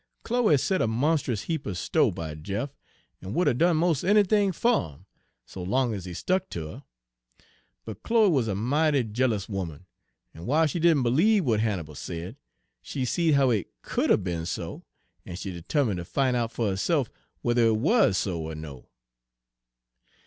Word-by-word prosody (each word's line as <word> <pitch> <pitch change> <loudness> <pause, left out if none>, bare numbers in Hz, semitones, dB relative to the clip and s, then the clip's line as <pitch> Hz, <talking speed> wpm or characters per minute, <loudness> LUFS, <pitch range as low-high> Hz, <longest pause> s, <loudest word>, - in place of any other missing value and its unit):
"Chloe 230 -10 +3
set 185 +8 0
a - - +2
monst'us 125 -2 0
heap 160 -4 -3
er 100 - -3
sto' - - +2
by 80 -2 -5
Jeff, 100 - -4 0.5
en 95 +4 -6
would 180 - +2
'a' - - +4
done 165 +6 +3
mos' 165 -3 +1
anythin' 205 0 +3
fer'im, 95 - 0 0.4
so 95 - -9
long 120 +6 0
ez 95 -4 -6
he 90 - -6
stuck 185 - -1
ter 85 - -5
her. 80 - -10 1.0
But 110 -2 -8
Chloe 225 -3 +3
wuz 130 -7 +1
a 100 - -1
mighty 140 +6 +2
jealous 110 -2 -1
'oman, 95 -5 -5 0.5
en 80 - -12
w'iles 155 +3 +3
she 175 - -2
didn' 160 -5 +4
b'liebe 180 - +3
w'at 110 -4 +2
Hannibal 95 -9 -2
said, 85 - -6 0.5
she 135 -3 -3
seed 160 +3 +2
how 135 -2 +4
it 105 -6 -1
could - - -1
'a' - - +6
be'n 85 -4 -4
so, - - -5 0.4
en 90 - -8
she 95 +1 -5
'termine' 115 - 0
fer 85 - -4
ter - - -13
fin' 130 +6 0
out 115 -2 -1
fer 115 -4 -1
herse'f 130 - 0 0.4
whuther 120 -1 +3
it 110 -1 +2
wuz 195 - +3
so 85 -5 -2
er 80 - -6
no. 75 -5 -9
120 Hz, 180 wpm, -26 LUFS, 95-160 Hz, 1.0 s, a